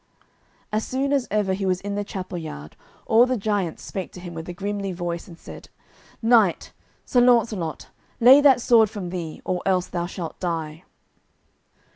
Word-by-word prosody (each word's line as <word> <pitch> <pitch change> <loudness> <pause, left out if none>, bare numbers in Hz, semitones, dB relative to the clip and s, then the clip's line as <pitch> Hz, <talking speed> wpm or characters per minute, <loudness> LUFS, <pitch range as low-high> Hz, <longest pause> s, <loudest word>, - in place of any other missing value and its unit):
As 215 +1 0
soon 275 +2 -1
as 275 -3 +1
ever 205 -2 0
he 195 +1 -3
was 185 -1 +1
in 200 +1 -5
the 205 0 -2
chapel 185 -3 -6
yard 75 - -8 0.3
all 235 +3 +5
the 255 0 0
giants 200 -5 -2
spake 190 -2 -6
to - - -10
him 175 -1 -8
with 165 +1 -7
a - - -3
grimly 200 +2 -4
voice, 170 -1 -4
and 170 -3 -12
said: - - -12 0.5
"Knight, 225 -6 +3 0.3
Sir 245 - +3
Launcelot, 225 -9 +1 0.3
lay 260 +5 +8
that 270 -4 +5
sword 225 -3 +5
from 190 -5 -6
thee, 170 -4 -6
or 180 -1 -1
else 185 -2 +1
thou 175 -1 -3
shalt 175 -3 -7
die." 165 -2 -4
190 Hz, 175 wpm, -23 LUFS, 175-225 Hz, 0.5 s, lay